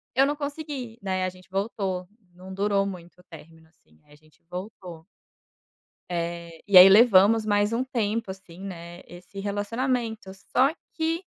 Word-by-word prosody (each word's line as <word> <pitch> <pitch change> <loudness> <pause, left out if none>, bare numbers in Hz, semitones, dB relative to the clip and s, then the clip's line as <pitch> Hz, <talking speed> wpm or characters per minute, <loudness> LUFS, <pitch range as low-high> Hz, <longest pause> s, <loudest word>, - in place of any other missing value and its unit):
eu 270 +2 +5
não 290 +1 -1
consegui, 285 -5 -6
né, 185 -1 -1
a - - -1
gente 185 0 -17
voltou, 190 -2 -3 0.3
não 185 +2 -11
durou 200 0 +1
muito 180 -2 -9
o - - -28
término, 160 0 -14
assim, 80 - -30
a 150 - -19
gente 155 +1 -26
voltou. 180 -3 -8 1.0
Eh, 170 -1 -5
e 195 -2 +9
aí 185 - +11
levamos 215 +1 +6
mais 205 0 +1
um 235 +2 0
tempo, 230 -4 -2
assim, 190 -2 -11
né, 175 -2 -8
esse 180 +3 -10
relacionamento. 220 +2 -2 0.3
Só 270 +3 +5 0.2
que 325 +2 -1
195 Hz, 155 wpm, -25 LUFS, 180-225 Hz, 1.0 s, aí